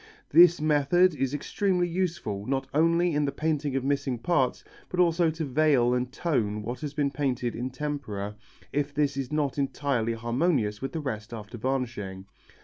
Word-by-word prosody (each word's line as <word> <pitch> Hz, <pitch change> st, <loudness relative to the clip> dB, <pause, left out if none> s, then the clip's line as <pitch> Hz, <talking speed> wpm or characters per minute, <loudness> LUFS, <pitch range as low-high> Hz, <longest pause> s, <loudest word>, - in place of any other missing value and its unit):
This 175 Hz, +2 st, +7 dB
method 155 Hz, +4 st, +3 dB
is 135 Hz, -3 st, -1 dB
extremely 180 Hz, +4 st, 0 dB
useful 170 Hz, -, -2 dB
not 135 Hz, 0 st, 0 dB
only 165 Hz, +3 st, +3 dB
in 150 Hz, 0 st, +1 dB
the 140 Hz, -, -1 dB
painting 150 Hz, -1 st, -1 dB
of 135 Hz, -, 0 dB
missing 140 Hz, -2 st, 0 dB
parts 135 Hz, -1 st, 0 dB, 0.3 s
but 180 Hz, -, -3 dB
also 170 Hz, -1 st, +4 dB
to 160 Hz, 0 st, -3 dB
veil 135 Hz, -3 st, +3 dB
and 125 Hz, 0 st, -1 dB
tone 110 Hz, -11 st, -1 dB
what 120 Hz, +3 st, -4 dB
has 145 Hz, -2 st, -5 dB
been 145 Hz, -3 st, +1 dB
painted 125 Hz, -4 st, -1 dB
in 125 Hz, +2 st, -3 dB
tempera 125 Hz, -8 st, -4 dB, 0.4 s
if 145 Hz, 0 st, -1 dB
this 145 Hz, -2 st, +1 dB
is 135 Hz, -1 st, -4 dB
not 145 Hz, -2 st, 0 dB
entirely 135 Hz, -4 st, 0 dB
harmonious 115 Hz, -1 st, 0 dB
with 135 Hz, -, -4 dB
the 160 Hz, -, -2 dB
rest 115 Hz, -4 st, -5 dB
after 110 Hz, +1 st, -9 dB
varnishing. 115 Hz, -7 st, -3 dB
140 Hz, 170 wpm, -27 LUFS, 120-155 Hz, 0.4 s, This